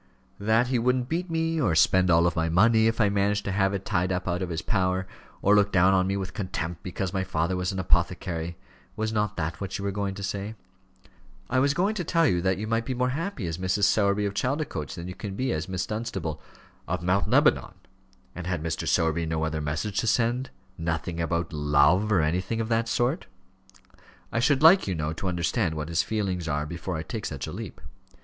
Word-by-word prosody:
"That 110 +4 +2
he 130 -2 +1
wouldn't 125 +1 +1
beat 175 +3 -2
me; 165 -1 0
or 85 - +2
spend 95 +3 +4
all 85 +1 +4
my 80 -1 0
money 110 +6 +4
if 115 +1 0
I 105 - +5
managed 100 +1 +1
to 100 - -1
have 95 0 +2
it 100 -1 -4
tied 90 +1 0
up 90 0 -2
out 90 0 -1
of 90 - -2
his 80 -1 -3
power; 95 -2 0 0.4
or 100 - +5
look 105 0 +4
down 95 +1 +4
on 95 -1 +3
me 100 +1 0
with 95 -1 -5
contempt 90 -5 -4
because 95 +1 -4
my 95 -1 0
father 90 -1 -1
was 90 +1 -1
an 95 - -5
apothecary! 85 -2 0 0.4
Was 110 0 -2
not 105 -1 -1
that 80 +3 -3
what 100 -1 -3
you 100 - -5
were 100 - 0
going 100 -1 -2
to 100 - -7
say?" 100 +3 -4 1.0
"I 130 - +3
was 140 +2 +2
going 195 +6 +1
to 200 -4 -3
tell 165 0 +2
you 90 - +2
that 95 +1 +1
you 105 - -3
might 115 +1 0
be 130 - -2
more 125 +1 +1
happy 160 - -3
as 80 0 -4
Mrs. 95 +2 0
Sowerby 100 +1 +3
of 100 - -2
Chaldicotes 125 - -2
than 85 -1 -7
you 90 - -5
can 100 0 -6
be 130 +3 -1
as 80 +4 -3
Miss 95 0 -2
Dunstable 95 -7 -4 0.2
" - - -30
"Of 90 -1 -2
Mount 90 +3 +1
Lebanon. - - +3 0.6
And 90 -1 -6
had 90 -4 -2
Mr. 80 -1 -3
Sowerby 80 0 +1
no 80 0 -1
other 80 -1 -2
message 75 +8 -2
to 115 - -1
send? 120 +3 +1 0.3
nothing 85 +1 -2
about 85 +1 -1
love, 75 +7 +3
or 95 -6 +4
anything 90 +8 -1
of 115 0 -2
that 115 0 +1
sort? 120 +8 0 1.0
I - - 0
should 140 +3 +2
like, 175 - +7
you 95 - -1
know, 75 0 -2
to 90 +4 -4
understand 85 0 0
what 75 0 -4
his 85 0 +2
feelings 95 -6 -2
are 75 0 -1
before 85 +2 -4
I 80 - -4
take 105 +6 -5
such 70 -3 -5
a - - -6
leap." - - -7
95 Hz, 225 wpm, -26 LUFS, 85-110 Hz, 1.0 s, like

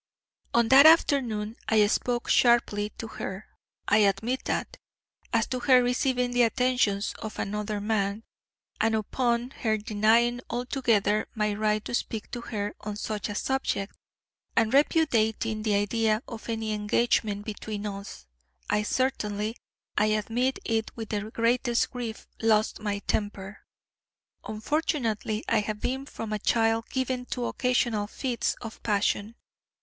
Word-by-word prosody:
"On 235 -1 +4
that 275 +3 +9
afternoon 240 -9 +3
I 215 -1 +5
spoke 240 +3 0
sharply 220 -4 +3
to - - -5
her 195 -2 -6 0.4
I 205 - +4
admit 215 +5 +1
that - - -2 0.5
as 230 -2 +2
to 255 - -2
her 250 0 +5
receiving 250 0 +1
the 245 0 +2
attentions 235 -4 +2
of 220 -1 -6
another 210 +1 -2
man; 205 0 -1 0.6
and 220 +1 +2
upon 235 +3 0
her 220 -4 0
denying 225 +3 +2
altogether 235 -4 +1
my 210 -1 0
right 215 0 0
to - - -5
speak 225 -2 -3
to 240 - -4
her 205 -3 -4
on 210 -1 -5
such 210 0 -3
a 205 - -4
subject, 240 -6 -1 0.6
and 225 +1 +2
repudiating 225 -7 +2
the 215 -1 +1
idea 215 +2 +1
of 230 0 -8
any 220 -1 -2
engagement 210 -1 +1
between 215 -1 -5
us, 200 - -7 0.5
I 210 0 +2
certainly, 210 -2 -1 0.4
I 210 - +3
admit 225 +5 0
it 225 -1 0
with 225 -2 -6
the 210 0 -3
greatest 240 +1 +1
grief, 240 -3 -5 0.2
lost 220 -1 +2
my 205 -1 -3
temper. 205 -1 -3 0.9
Unfortunately 225 -3 -1
I 230 - +3
have 210 0 -3
been 265 +4 -2
from 220 -5 -5
a 210 - -1
child 225 +1 +1
given 255 -1 -2
to 245 -2 -3
occasional 240 -5 0
fits 245 +2 -2
of 225 -2 -8
passion. 210 +1 0
220 Hz, 140 wpm, -27 LUFS, 210-245 Hz, 0.9 s, that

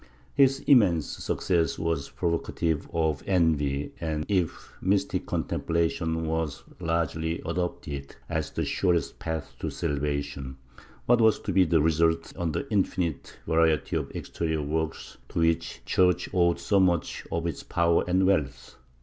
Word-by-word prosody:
His 135 0 +4
immense 95 - +5
success 85 -3 -1
was 80 -4 -1
provocative 85 -2 -1
of 80 -3 0
envy 75 -6 +1
and, 80 -2 -2
if 90 -5 -1
mystic 95 +1 0
con - - 0
templation 80 0 -1
was 80 -3 -2 0.2
largely 80 -1 -1
adopted 80 -5 -4
as - - -2
the - - -2
surest 85 -6 0
path 80 -3 -4
to - - -2
salvation, 70 -2 -3 0.5
what 120 -1 +4
was 110 -1 +5
to 100 - -3
be 95 0 +5
the 80 -2 +3
result 80 +1 +1
on 85 -2 -1
the 140 - -3
infinite 90 -6 -1
variety 80 -1 +2
of - - -1
exterior 80 -2 -2
works 80 +2 -3
to - - -1
which 80 0 +1
the - - -19
Church 90 -1 +2
owed 85 -2 +3
so 100 - +2
much 90 -3 +1
of 85 0 -1
its 85 - -3
power 85 0 +2
and 95 +1 +3
wealth? 70 -9 0
80 Hz, 145 wpm, -27 LUFS, 80-90 Hz, 0.5 s, immense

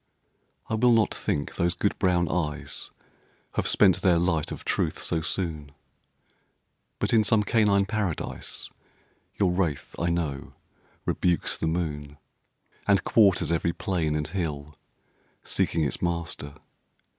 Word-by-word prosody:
I - - -4
will 120 +2 +4
not 115 -3 +3
think 70 - -2
those 85 +1 +1
good 100 - -1
brown 90 -2 +2
eyes 75 -2 -2 0.6
Have - - -1
spent 95 -5 +4
their 90 -3 +4
light 85 -3 0
of - - -7
truth - - 0
so 80 - 0
soon; 80 -5 -2 1.2
But - - -1
in 110 -2 +5
some 110 -1 +3
canine 105 -2 +3
Paradise 100 -5 -3 0.7
Your 95 -3 +3
wraith, 85 -6 -1
I 85 - +1
know, 80 -5 -2 0.5
rebukes 90 -2 +1
the 80 - -2
moon, 75 -4 -3 0.7
And 100 -1 +4
quarters 100 -6 +4
every 85 0 +1
plain 85 -6 -1
and 75 0 -1
hill 75 -5 -4 0.7
Seeking 80 - 0
its 70 - -1
master. 85 -4 -3
85 Hz, 130 wpm, -26 LUFS, 75-95 Hz, 1.2 s, in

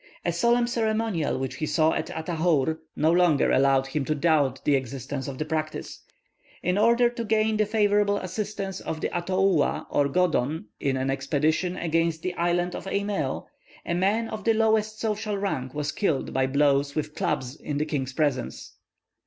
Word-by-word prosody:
A 175 - +2
solemn 235 +7 +3
ceremonial 220 - 0
which 130 -1 -4
he 155 - -2
saw 160 0 +3
at 155 - -2
Atahour, 160 -2 0 0.2
no 155 +2 +3
longer 175 -4 +3
allowed 135 0 +3
him 135 +1 -2
to 155 - 0
doubt 145 -4 +2
the 145 - +3
existence 135 +1 -4
of 135 -2 -5
the 155 - -2
practice. 155 0 -4 0.6
In 180 +1 +1
order 235 +2 +5
to 235 -1 -4
gain 220 0 +1
the 215 -1 +2
favourable 205 -1 +2
assistance 195 0 -4
of 160 - -5
the - - -3
Atoua 185 -2 +1
or 145 - +2
Godon 155 -5 +1
in 135 -1 0
an 130 +1 0
expedition 155 +6 0
against 165 -1 0
the 185 - -2
island 175 0 0
of - - -7
Eimèo, 200 +1 -2 0.4
a - - -1
man 200 +6 +1
of 215 -1 -6
the 225 +1 +3
lowest 220 -1 +1
social 215 -1 -2
rank 135 -10 -3
was 145 -1 -1
killed 160 -9 -1
by 130 0 +2
blows 140 0 +2
with 150 0 -2
clubs 130 -2 -2
in 145 - -4
the 150 - 0
king's 135 -4 -3
presence. 140 -4 -2
165 Hz, 175 wpm, -26 LUFS, 145-205 Hz, 0.6 s, order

